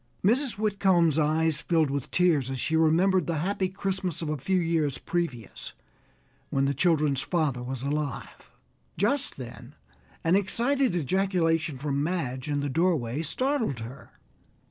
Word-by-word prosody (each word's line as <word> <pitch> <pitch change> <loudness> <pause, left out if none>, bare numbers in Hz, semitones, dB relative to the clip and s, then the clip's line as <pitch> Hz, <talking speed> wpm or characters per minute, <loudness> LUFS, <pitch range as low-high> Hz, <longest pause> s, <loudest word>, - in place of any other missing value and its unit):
Mrs. 250 +5 +3
Whitcomb's 190 -7 +2
eyes 155 0 +1
filled 160 -5 +1
with 140 -2 -3
tears 160 -8 +2
as 135 -1 -4
she 160 - 0
remembered 165 +3 +3
the 165 -2 -1
happy 190 +3 -1
Christmas 190 -3 -3
of 155 - -3
a 150 - -1
few 185 +8 0
years 165 -5 0
previous, 160 - -4 0.8
when 135 0 +1
the 140 - +1
children's 150 -2 +2
father 150 -8 -1
was 130 0 -5
alive. 145 -1 -4 0.5
Just 275 +8 0
then 125 +1 -10 0.5
an 165 +3 +3
excited 240 +3 +1
ejaculation 170 -2 +1
from 140 +1 -1
Madge 145 -5 -2
in 145 -1 0
the 145 - -1
doorway 150 -5 +1
startled 240 - -1
her. 120 +5 -9
160 Hz, 145 wpm, -27 LUFS, 140-185 Hz, 0.8 s, Mrs